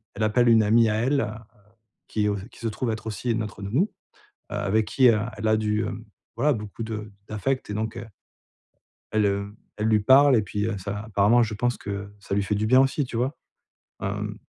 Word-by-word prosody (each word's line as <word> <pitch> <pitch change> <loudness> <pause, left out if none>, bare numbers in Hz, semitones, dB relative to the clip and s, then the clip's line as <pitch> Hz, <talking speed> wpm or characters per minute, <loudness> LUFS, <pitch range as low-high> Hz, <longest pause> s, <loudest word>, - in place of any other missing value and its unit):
elle 110 - -2
appelle 120 +3 +3
une 115 -1 +6
amie 115 +2 +4
à 105 - 0
elle, 130 +6 +1
heu, - - -2 0.8
qui 105 -1 0
au 100 - -1
qui - - -16
se 115 - -3
trouve 115 +2 -2
être 110 0 -5
aussi 110 +2 -2
notre 105 -2 -4
nounou, 130 - 0 0.6
heu, - - -3
avec 105 +2 +1
qui, 130 -2 +4
heu, 110 -2 +3 0.2
elle 110 +1 -2
a 110 - +4
du 105 0 0
hem, 110 +2 -6 0.3
voilà 140 +6 +2
beaucoup 105 0 -6
de 110 -1 -5 0.2
d'affect 120 +5 -2
et - - -3
donc 110 +1 -3
heu 120 - -6 1.1
elle, 110 -1 +2
heu, 100 +1 -1 0.2
elle 105 - 0
lui 110 -1 +4
parle 135 +5 +6
et 110 - +4
puis, 105 0 -3
heu, 110 -3 -2
ça 100 +2 -4
apparemment 110 +3 +4
je 110 -1 -3
pense 120 +3 -1
que 100 0 -6
ça 100 0 -4
lui 100 - +1
fait 105 +1 -1
du 105 +1 0
bien 130 +3 +6
aussi 135 +2 +1
tu 120 - -5
vois? 130 +5 -1 0.6
Hem, - - -3
110 Hz, 220 wpm, -25 LUFS, 105-120 Hz, 1.1 s, une